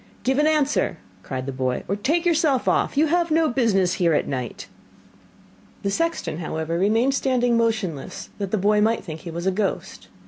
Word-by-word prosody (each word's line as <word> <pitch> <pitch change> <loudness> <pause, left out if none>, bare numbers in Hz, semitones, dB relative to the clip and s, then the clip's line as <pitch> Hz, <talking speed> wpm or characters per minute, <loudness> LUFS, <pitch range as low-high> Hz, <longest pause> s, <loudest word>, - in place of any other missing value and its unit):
'Give 265 +2 +1
an 300 - +4
answer,' 295 - +1 0.2
cried 130 +5 -5
the 135 - -3
boy, 130 -1 -2
'or 195 - 0
take 310 - 0
yourself 310 -6 +2
off, - - +1
you 305 - +5
have 340 +2 +1
no 320 0 +3
business 210 -9 +2
here 170 -4 +2
at - - 0
night.' 125 -4 -5 1.2
The 200 - 0
sexton, 200 - -1
however, 160 0 -3
remained 225 +7 +2
standing 250 -3 +1
motionless 220 -9 -2
that 200 -2 -2
the 215 - 0
boy 210 +2 +3
might 225 +2 +1
think 160 -2 -7
he 170 - -8
was 170 +2 -5
a 190 - +3
ghost. 185 - -3
210 Hz, 185 wpm, -23 LUFS, 170-270 Hz, 1.2 s, you